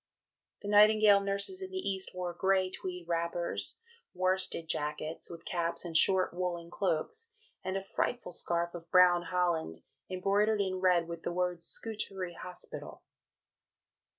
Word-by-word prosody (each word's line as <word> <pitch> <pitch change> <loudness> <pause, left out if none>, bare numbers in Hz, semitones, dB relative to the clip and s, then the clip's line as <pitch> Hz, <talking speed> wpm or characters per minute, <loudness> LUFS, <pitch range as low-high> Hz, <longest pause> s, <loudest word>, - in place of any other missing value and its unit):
" - - -60
The - - -5
Nightingale 210 0 +6
nurses 200 - -1
in 380 - -5
the 375 - -5
East 190 - -2
wore 180 -1 -3
"grey 190 +1 +1
tweed 180 -2 -6
wrappers, 170 0 -2 0.4
worsted 185 -2 0
jackets, 150 +1 -3
with 170 -1 -10
caps 170 -1 -2
and 165 -2 -6
short 185 +3 +4
woollen 175 -1 -3
cloaks, 195 - -2 0.3
and 190 +1 -2
a 195 - -4
frightful 220 +1 -2
scarf 170 0 0
of 170 -1 -9
brown 180 -1 +6
holland, 170 - -1 0.3
embroidered 200 +3 +1
in 190 -2 -1
red 180 -3 +3
with 170 -1 -6
the - - -3
words, 180 -1 -1
'Scutari 195 -5 -1
Hospital.'" 180 +1 -9
180 Hz, 145 wpm, -31 LUFS, 170-195 Hz, 0.4 s, Nightingale